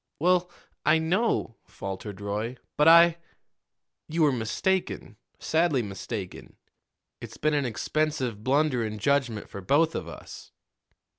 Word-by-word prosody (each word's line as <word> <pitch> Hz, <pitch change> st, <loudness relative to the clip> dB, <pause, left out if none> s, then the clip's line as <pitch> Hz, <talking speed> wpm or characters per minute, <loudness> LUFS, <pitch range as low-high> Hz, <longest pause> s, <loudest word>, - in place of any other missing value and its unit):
"Well, 180 Hz, +2 st, +2 dB, 0.3 s
I 155 Hz, +1 st, +4 dB
know," 165 Hz, -, 0 dB
faltered 100 Hz, +1 st, -7 dB
Roy; 105 Hz, +5 st, -3 dB, 0.2 s
"but 150 Hz, -, +3 dB
I 170 Hz, 0 st, +7 dB, 0.4 s
" -, -, -59 dB
"You 160 Hz, +1 st, +1 dB
were 150 Hz, -, +5 dB
mistaken 135 Hz, -, -2 dB, 0.2 s
sadly 160 Hz, -6 st, +1 dB
mistaken. 100 Hz, -1 st, -7 dB, 0.7 s
It's -, -, -9 dB
been 155 Hz, +1 st, +1 dB
an 145 Hz, -2 st, +1 dB
expensive 125 Hz, -2 st, -2 dB
blunder 135 Hz, -1 st, +2 dB
in 110 Hz, -1 st, -4 dB
judgment 125 Hz, -2 st, 0 dB
for 100 Hz, -, -8 dB
both 155 Hz, -, +2 dB
of 85 Hz, -, -4 dB
us." 85 Hz, -, -11 dB
140 Hz, 130 wpm, -27 LUFS, 105-160 Hz, 0.7 s, I